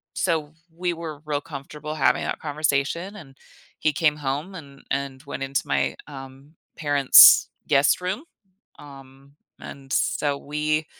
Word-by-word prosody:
so 160 -4 -1 0.2
we 175 0 -2
were 160 -3 -8
real 145 -1 -2
comfortable 150 0 -8
having 145 - +2
that - - -3
conversation, 155 +5 -2
and 135 -7 -14 0.4
he 155 - +1
came 150 0 +2
home 145 +7 -4
and 140 -5 -12
and 140 -1 -3
went 140 -1 -6
into 135 0 -2
my, - - 0
um, 135 +1 -12 0.2
parents' 145 -3 +7 0.2
guest 140 -1 +3
room, 190 - -3 0.6
um, 135 -1 -15 0.3
and 135 -1 -10
so 145 -1 0
we 150 +2 -2
145 Hz, 135 wpm, -23 LUFS, 140-155 Hz, 0.6 s, parents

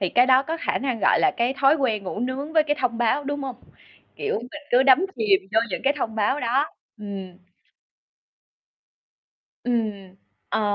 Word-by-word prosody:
thì 190 - 0
cái 245 +6 +4
đó 260 +1 +5
có 320 +4 -3
khả - - -1
năng, 255 -4 -2
gọi 195 - +4
là, - - +4
cái 240 +3 0
thói 275 +2 +6
quen 230 -7 0
ngủ 190 - -5
nướng 265 +5 -3
với 315 -1 +5
cái 295 -1 -1
thông 240 -3 -1
báo, 240 +5 +1
đúng 290 +1 -3
hông? 260 -3 -5 0.6
Kiểu, 435 - -2
mình 260 +6 -10
cứ 250 +2 +5
đắm 275 +7 +5
chìm 205 -4 +3
vô 220 - +4
những - - -3
cái 275 - +4
thông 225 -4 -3
báo 220 +7 0
đó. 265 +5 +1 0.3
Ừm. 195 -3 -7 2.3
Ừm, 215 -6 -2 0.3
ờ, - - 0
245 Hz, 185 wpm, -23 LUFS, 215-275 Hz, 2.3 s, thói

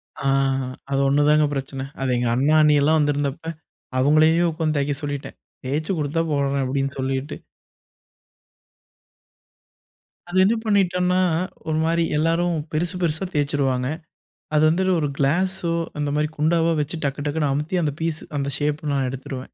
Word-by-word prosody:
அ, - - -10 0.7
அது 135 - +1
ஒண்ணு 145 +2 +3
தாங்க 150 0 +5
பிரச்சன. 135 -1 -4 0.2
அது 135 -1 0
எங்க 120 - 0
அண்ணா, 140 +5 +2
அண்ணிலாம் 150 +1 +4
வந்திருந்தப்ப 145 +2 -1 0.5
அவங்களையே 155 +5 +4
உக்காந்து 155 -1 -1
தேய்க்க 140 0 0
சொல்லிட்டேன். 145 -1 -5 0.3
தேச்சு 150 +7 -2
குடுத்தா 155 +2 0
போடுறேன் 140 -1 0
அப்டின்னு 135 +1 -2
சொல்லிட்டு. 135 +2 -2 2.9
அது 180 - -2
என்ன 210 +5 +3
பண்ணிட்டோம்னா, 180 -4 +2 0.5
ஒரு 155 - 0
மாரி 165 +1 +2
எல்லாரும் 165 +2 +1 0.2
பெருசு 165 +3 -1
பெருசா 165 +1 0
தேச்சுருவாங்க. 140 -3 0 0.7
அது 150 - +4
வந்து 170 +4 +1 0.2
ஒரு 150 - 0
கிலாஸ்சோ, 175 +4 0 0.3
அந்த 145 -1 -1
மாரி 150 0 +1
குண்டாவோ, 165 +2 +2
வெச்சு 150 +3 -2
டக்கு 140 +1 -3
டக்குன்னு 145 -1 0
அமுத்தி 150 +6 -1
அந்த 145 -2 0
பிஸ்ஸு 160 -1 -3
அந்த 140 0 -2
ஷேப் 150 +1 -1
நான் 135 -2 0
எடுத்துருவேன். 130 0 -6
150 Hz, 140 wpm, -22 LUFS, 140-165 Hz, 2.9 s, தாங்க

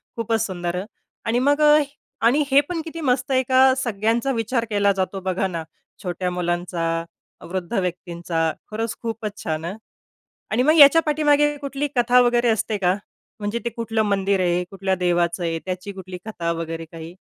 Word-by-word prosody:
खूपच 225 -1 0
सुंदर. 175 -3 -3
अ, - - -8 0.4
आणि 235 +1 +1
मग 285 +3 +2
अ, 300 0 +7 0.5
आणि 275 +6 +4
हे 275 +1 +7
पण 345 -2 -2
किती 330 0 -6
मस्त 270 0 0
आहे 260 0 +3
का, 260 0 +6
सगळ्यांचा 230 +1 0
विचार 230 0 -1
केला 205 -1 +3
जातो, 195 0 -2
बघा 185 +1 -1
ना, 170 -3 -4 0.4
छोट्या 180 0 -2
मुलांचा, 175 -1 -1 0.5
वृद्ध 180 -1 -4
व्यक्तींचा. 170 -2 -2 0.2
खरंच 225 +1 -2
खूपच 220 -3 -5
छान 160 0 -2
हं. 190 +5 -5 0.7
आणि 235 +3 +2
मग 310 +4 +4
याच्या 290 +3 +9
पाठीमागे 295 -1 +3
कुठली 280 0 -3
कथा 245 +1 +5
वगैरे 240 0 +3
असते 220 -1 +1
का? 180 -1 +2 0.5
म्हणजे 205 +3 -2
ते - - +1
कुठलं 225 -1 -1
मंदिर 200 -2 +1
आहे, 180 0 +1
कुठल्या 195 -1 -1
देवाचं 175 -1 0
आहे, 165 -1 -1
त्याची 185 +2 -4
कुठली 185 -1 -8
कथा 170 -6 -2
वगैरे 165 0 -4
काही? 165 +1 -9
205 Hz, 170 wpm, -22 LUFS, 180-245 Hz, 0.7 s, याच्या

